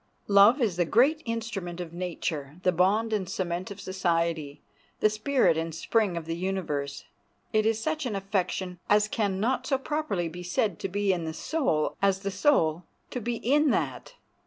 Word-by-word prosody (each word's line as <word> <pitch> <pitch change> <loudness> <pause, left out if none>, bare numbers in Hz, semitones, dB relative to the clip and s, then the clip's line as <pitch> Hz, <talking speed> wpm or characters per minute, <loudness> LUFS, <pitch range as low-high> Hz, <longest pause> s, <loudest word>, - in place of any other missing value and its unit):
Love 205 +6 +6
is 195 -7 0
the 175 - +3
great 275 - +3
instrument 220 -7 -4
of 170 -2 -6
nature, 165 -4 -4
the 180 - +4
bond 205 +6 +2
and 195 -4 -1
cement 180 0 -3
of 200 -1 -8
society, 170 -6 -1 0.4
the 215 - +4
spirit 215 - +2
and 165 -1 -4
spring 195 +1 +1
of 165 - -5
the 165 0 -3
universe. 165 -6 -3 0.5
It 215 0 +3
is 225 -1 +1
such 310 +2 -2
an 215 - -3
affection 190 -2 -2
as 210 +1 +4
can 205 -3 -1
not 245 +5 0
so 270 - +2
properly 270 - -2
be 175 +2 -8
said 180 +1 -1
to 195 - -3
be 200 0 +1
in 170 -2 -3
the 160 - -4
soul 215 - 0
as 195 -1 +2
the 200 0 -2
soul 180 - +2 0.3
to 250 - -3
be 235 +2 -2
in 290 +6 +2
that. - - -2
195 Hz, 180 wpm, -27 LUFS, 170-225 Hz, 0.5 s, Love